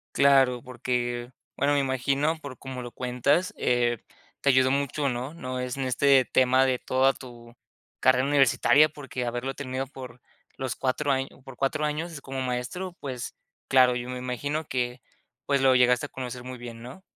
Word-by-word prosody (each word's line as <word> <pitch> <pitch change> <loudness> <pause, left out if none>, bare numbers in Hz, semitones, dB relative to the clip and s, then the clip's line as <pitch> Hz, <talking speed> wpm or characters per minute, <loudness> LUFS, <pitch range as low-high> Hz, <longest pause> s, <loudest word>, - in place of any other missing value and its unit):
Claro, 135 -3 +4
porque, 120 0 -3 0.2
bueno, 145 +1 +2
me 145 - +3
imagino, 140 +4 0
por 140 -4 -9
como 130 -2 -7
lo 120 - -7
cuentas, 140 - 0
eh, 120 -1 +1 0.4
te 140 - +2
ayudó 130 -1 +4
mucho, 140 +1 0
¿no? 125 +3 -3
No 130 -5 -5
es 125 +1 -4
en 135 - -2
este 135 +1 +4
tema 130 +1 +4
de 130 -1 +1
toda 130 +1 +2
tu 120 -2 -12 0.5
carrera 130 0 +4
universitaria, 145 +2 +4
porque 135 -4 -6
haberlo 120 +3 -3
tenido 130 -1 -4
por 130 -3 -10 0.4
los 130 -2 -3
4 140 +2 0
año 135 0 -2
por 135 -2 -11
4 150 +3 0
años, 150 0 -3
como 135 0 -5
maestro, 130 +9 -3
pues, 130 -3 -6 0.3
claro, 125 -2 +5
yo 120 +1 -4
me 125 - -4
imagino 145 +5 -3
que, 125 -1 -2 0.5
pues, 140 -1 +1
lo 130 -1 +5
llegaste 125 +2 +4
a - - -32
conocer 125 -1 -6
muy 130 0 -7
bien, 120 -1 -9
¿no? 125 +10 -10
130 Hz, 175 wpm, -26 LUFS, 125-140 Hz, 0.5 s, claro